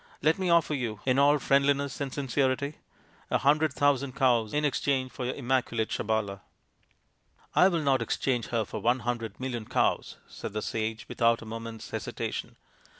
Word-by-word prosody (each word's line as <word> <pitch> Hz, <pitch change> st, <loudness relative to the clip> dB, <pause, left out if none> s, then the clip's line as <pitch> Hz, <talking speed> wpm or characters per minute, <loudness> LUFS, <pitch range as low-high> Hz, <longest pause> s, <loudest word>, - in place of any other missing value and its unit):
Let 160 Hz, +4 st, +3 dB
me 185 Hz, -2 st, 0 dB
offer 170 Hz, -2 st, +4 dB
you, 115 Hz, -7 st, -3 dB
in 130 Hz, 0 st, +3 dB
all 145 Hz, +1 st, +5 dB
friendliness 140 Hz, 0 st, +1 dB
and 140 Hz, -2 st, -2 dB
sincerity, 140 Hz, +1 st, -1 dB, 0.5 s
a -, -, +3 dB
hundred 150 Hz, +2 st, +3 dB
thousand 140 Hz, -1 st, +1 dB
cows 120 Hz, -5 st, +2 dB
in 150 Hz, +1 st, +1 dB
exchange 135 Hz, -2 st, 0 dB
for 125 Hz, -, -5 dB
your 125 Hz, -, -2 dB
immaculate 125 Hz, -4 st, 0 dB
Sabala." 105 Hz, -3 st, -1 dB, 0.6 s
" -, -, -44 dB, 0.3 s
I 180 Hz, -, +7 dB
will 170 Hz, -4 st, 0 dB
not 135 Hz, -3 st, +3 dB
exchange 120 Hz, +1 st, -1 dB
her 115 Hz, -2 st, 0 dB
for -, -, -6 dB
one 120 Hz, +2 st, +2 dB
hundred 120 Hz, -2 st, -3 dB
million 125 Hz, -4 st, -4 dB
cows/' -, -, 0 dB
said -, -, -7 dB
the 110 Hz, -, -3 dB
sage, 110 Hz, 0 st, -3 dB
without 115 Hz, 0 st, +2 dB
a -, -, -10 dB
moment's 115 Hz, 0 st, -7 dB
hesitation. -, -, -4 dB
130 Hz, 170 wpm, -28 LUFS, 115-140 Hz, 0.6 s, I